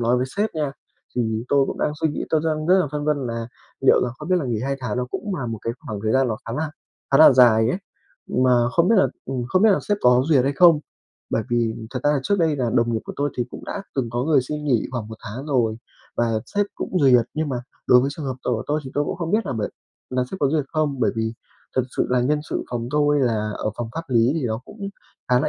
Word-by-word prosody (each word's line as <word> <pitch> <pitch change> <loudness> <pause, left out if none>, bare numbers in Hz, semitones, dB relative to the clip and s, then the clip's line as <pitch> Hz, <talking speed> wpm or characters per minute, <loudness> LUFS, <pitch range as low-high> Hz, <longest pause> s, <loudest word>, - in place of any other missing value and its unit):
lói 120 +1 +2
với 125 +1 0
sếp 210 +1 +1
nha. 150 -3 -1 0.4
Thì 110 -2 -1
tôi 140 -1 +3
cũng - - -5
đang 150 - 0
suy 160 - +2
nghĩ, 150 - -3
tôi 155 - +3
đang 155 -1 -1
rất 185 +2 +5
là 180 - +1
phân 145 0 -2
vân 145 -4 0
là 115 -1 -4 0.3
liệu - - +5
là 125 - -1
không 150 - -7
biết 185 - +3
là 155 - -3
nghỉ 115 -3 -1
2 135 0 -1
tháng 125 -1 -3
nó 125 - 0
cũng 205 -3 -3
là 125 -6 -3
một 115 -1 -4
cái 115 - -2
khoảng 105 -2 -4
thời 110 0 +1
gian 130 -1 +3
nó 110 - -1
khá 115 - -4
là 150 +4 -2 0.4
khá 135 - +6
là 155 - +9
dài 115 -3 +6
ấy. 180 - 0 0.5
Mà 125 -1 +3
không 170 +4 +2
biết 225 - +5
là, - - +5 0.2
ừm, 130 -2 -3
không 185 +2 +2
biết 220 - +7
là 190 - +4
sếp 205 0 +2
có 125 0 +5
duyệt 135 -5 +4
hay 140 - +1
không. 165 +1 +6 0.5
Bởi 110 - +1
vì 115 -2 +1 0.2
thật 125 - -4
ra 145 - +4
là 140 - +1
trước 200 +8 +1
đây 160 -3 +2
là 120 -3 0
đồng 120 0 +2
nghiệp 110 - 0
của - - -6
tôi 145 0 0
thì 120 - 0
cũng - - -9
đã 200 - -5
từng 125 -4 -1
có 120 +1 -1
người 150 -4 +4
xin 150 +3 -5
nghỉ 125 -7 +1
khoảng 120 -4 -4
1 110 - -8
tháng 125 +8 -6
rồi 120 -6 +1 0.4
và 115 -2 +1
sếp 205 0 0
cũng 185 - -2
duyệt. 125 -5 +5
Nhưng 155 -1 -1
mà 130 - -2 0.3
đối 125 - +7
với 135 +2 0
trường 155 - -7
hợp 130 - -3
tồi 120 -1 -1
tôi 150 +1 0
thì 130 - -7
tôi 145 +1 +1
cũng - - -3
không 170 -1 -3
biết 215 0 +1
là - - -2
bởi 110 -4 -2 0.4
là 125 0 0
sếp 190 - -5
có 140 - +3
duyệt 150 -1 +1
không. 150 -4 -1
Bởi - - +3
vì 110 0 -1 0.4
thật 130 - +4
sự - - +2
là 125 -1 +3
nhân 150 +4 +1
sự - - -2
phòng 120 -1 -3
tôi 145 -1 +2
là 110 -4 0
ở 110 - -2
phòng 120 -2 -4
pháp 165 - -3
lý 120 -1 +3
thì 160 - -1
nó 110 0 -2
cũng 200 -2 -7 0.4
khá 125 -1 +4
là 155 - 0
130 Hz, 285 wpm, -23 LUFS, 120-150 Hz, 0.5 s, là